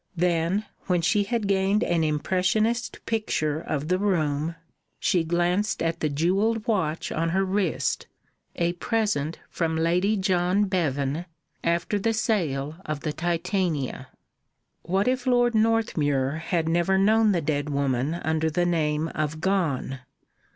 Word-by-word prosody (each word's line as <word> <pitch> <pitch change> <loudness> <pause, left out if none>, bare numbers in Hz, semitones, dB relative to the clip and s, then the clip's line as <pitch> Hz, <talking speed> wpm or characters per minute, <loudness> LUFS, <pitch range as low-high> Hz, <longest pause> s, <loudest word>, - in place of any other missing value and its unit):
Then, 175 +4 +1 0.2
when 180 -2 +1
she 205 +3 +2
had 225 -1 -1
gained 195 +2 +2
an 170 -2 +1
impressionist 190 +9 0
picture 155 -9 -1
of 150 -2 -3
the 185 +2 +1
room, 165 -5 0 0.4
she 175 -3 +1
glanced 175 +5 0
at 165 0 -1
the 155 - 0
jewelled 195 +9 +1
watch 175 -8 -1
on 165 +1 0
her 190 +3 +1
wrist, 190 -3 -1 0.5
a 170 0 0
present 180 -7 -1
from 165 -2 -1
Lady 180 +6 +2
John 185 0 +2
Bevan 155 -4 -1 0.4
after 170 +5 0
the 225 +3 +1
sale 160 - -1
of 155 -2 -4
the 155 - -2
Titania. 170 -5 -1 0.7
What 190 +5 0
if 255 0 0
Lord 245 -1 +3
Northmuir 160 -11 +1
had 165 -3 0
never 175 +3 +2
known 215 +2 +4
the 180 - +2
dead 145 -1 -1
woman 140 +1 0
under 160 -1 0
the 175 +3 0
name 155 -2 +1
of 155 0 -3
Gone? 160 -8 0
175 Hz, 135 wpm, -25 LUFS, 155-200 Hz, 0.7 s, known